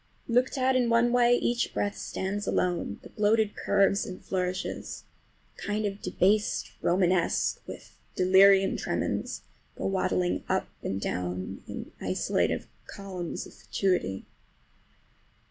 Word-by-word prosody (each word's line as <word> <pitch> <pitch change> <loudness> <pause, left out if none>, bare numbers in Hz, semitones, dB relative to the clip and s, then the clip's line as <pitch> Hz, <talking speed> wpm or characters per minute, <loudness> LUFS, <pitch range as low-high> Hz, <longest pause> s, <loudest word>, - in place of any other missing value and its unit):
Looked 250 +3 +2
at 260 0 +2
in 245 -2 +2
one 235 +1 +4
way 245 0 +5
each 240 0 0
breadth 205 0 0
stands 200 +2 -3
alone, 175 - 0
the - - -11
bloated 215 0 +2
curves 200 0 +2
and 185 - -7
flourishes—a 185 0 -5
kind 210 +1 -1
of 200 0 -3
"debased 210 +3 +1
Romanesque" 180 -1 +2
with - - -10 0.2
delirium 195 +1 +5
tremens—go - - -4
waddling 185 -2 0
up - - 0
and 95 - -2
down 90 0 -3
in - - -7
isolated - - 0 0.2
columns 185 -4 -6
of - - -13
fatuity. 180 - -1
195 Hz, 115 wpm, -28 LUFS, 180-215 Hz, 0.2 s, way